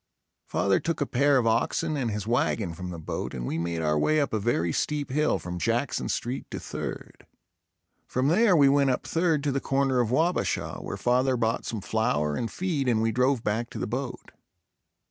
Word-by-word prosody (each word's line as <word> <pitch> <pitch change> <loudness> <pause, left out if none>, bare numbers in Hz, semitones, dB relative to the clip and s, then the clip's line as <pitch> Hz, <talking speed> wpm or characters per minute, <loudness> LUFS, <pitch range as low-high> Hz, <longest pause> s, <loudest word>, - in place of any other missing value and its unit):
Father 100 -1 +2
took 165 -1 -2
a 145 - +1
pair 140 +2 +3
of 125 - +1
oxen 120 +8 +1
and 130 -5 -1
his 105 -2 -3
wagon 110 -5 0
from 90 +2 -6
the 85 - -6
boat 80 - -5
and - - -4
we 80 - -2
made 85 -1 -2
our 75 -1 +2
way 155 - +3
up 140 -5 0
a 110 - +1
very 85 -7 0
steep 145 -3 -1
hill 150 +3 +2
from 90 0 -6
Jackson 115 +8 -1
Street 125 +3 -3
to - - -5
Third. - - -7 0.8
From 130 +2 0
there 195 +3 +4
we 145 -4 +6
went 140 0 +4
up 125 - -1
Third 165 -3 +1
to 145 - +1
the 135 0 -1
corner 135 -1 +1
of 120 -3 +1
Wabasha, 160 +8 0
where - - -5
father 125 +1 +2
bought 115 -1 0
some 110 -3 -4
flour 105 -10 0
and 115 - -2
feed 165 -8 -1
and 115 -3 +3
we 115 - +2
drove 125 0 +1
back 115 +3 -1
to - - -8
the - - -2
boat. 125 +2 -5
125 Hz, 205 wpm, -27 LUFS, 105-140 Hz, 0.8 s, we